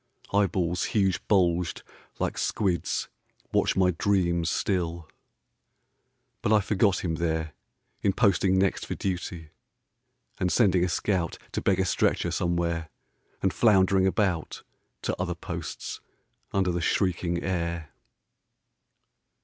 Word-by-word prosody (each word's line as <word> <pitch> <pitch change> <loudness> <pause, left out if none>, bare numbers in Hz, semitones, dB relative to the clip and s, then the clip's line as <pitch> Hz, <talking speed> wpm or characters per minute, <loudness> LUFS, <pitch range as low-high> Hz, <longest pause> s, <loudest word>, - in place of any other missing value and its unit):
Eyeballs, 90 -3 +1
huge 95 -3 +2
bulged 90 -4 +2 0.3
like - - -1
squids 95 -5 -1 0.4
Watch - - +2
my 95 -1 +4
dreams 85 -2 +1
still; 85 -4 -1 1.3
but 105 - 0
I 110 - +6
forgot 100 -1 +1
him 80 -2 -1
there 80 -2 -1 0.5
In 100 - +3
posting 95 -3 +3
next 95 0 +1
for - - -3
duty, 85 -4 -4 0.9
and 90 -1 +1
sending 95 -7 +4
a 90 - +1
scout 85 0 -1
To - - -2
beg 95 -1 +2
a 95 - +2
stretcher 90 - +1
somewhere, 85 -2 -1 0.5
and 95 - +2
floundering 95 -3 +4
about 95 -5 -1 0.4
To - - -1
other - - -2
posts - - -6 0.5
under 95 -2 +1
the 85 0 -2
shrieking 85 -1 0
air. 85 -4 -2
90 Hz, 115 wpm, -27 LUFS, 85-95 Hz, 1.3 s, I